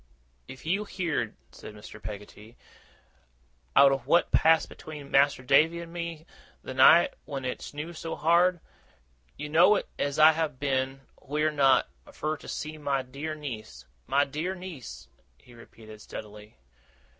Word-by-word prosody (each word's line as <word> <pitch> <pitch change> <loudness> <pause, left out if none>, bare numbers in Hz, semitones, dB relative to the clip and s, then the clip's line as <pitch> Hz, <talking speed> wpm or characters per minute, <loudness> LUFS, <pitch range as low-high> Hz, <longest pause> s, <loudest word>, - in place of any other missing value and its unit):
'If 130 - -11
you 190 +6 0
heerd,' 165 - -3 0.2
said 105 - -11
Mr. 105 0 -12
Peggotty, 105 +2 -10 1.2
'owt 140 0 +7
of 135 0 -2
what 170 - +3
passed 160 0 +4
between 150 -3 -10
Mas'r 140 -2 +3
Davy 155 +5 +4
and 170 0 -9
me, 170 -2 -6 0.4
th' 130 - -6
night 135 +6 +6
when 135 -2 -5
it 125 - -4
snew 150 +4 -7
so 165 0 -5
hard, 170 +2 +3 0.8
you 150 - -5
know 175 +7 +4 0.2
as 140 0 -1
I 155 +1 +8
have 155 -4 -3
been 135 -1 -1 0.2
wheer 150 +2 0
not 140 -3 +3 0.2
fur 155 +1 -3
to - - -14
seek 155 0 -5
my 140 -2 -1
dear 140 +5 -6
niece. 110 - -8 0.2
My 140 +2 +3
dear 155 +7 -4
niece,' 155 - -9 0.3
he 120 - -19
repeated 110 -2 -14
steadily. 105 -3 -10
145 Hz, 145 wpm, -27 LUFS, 130-160 Hz, 1.2 s, I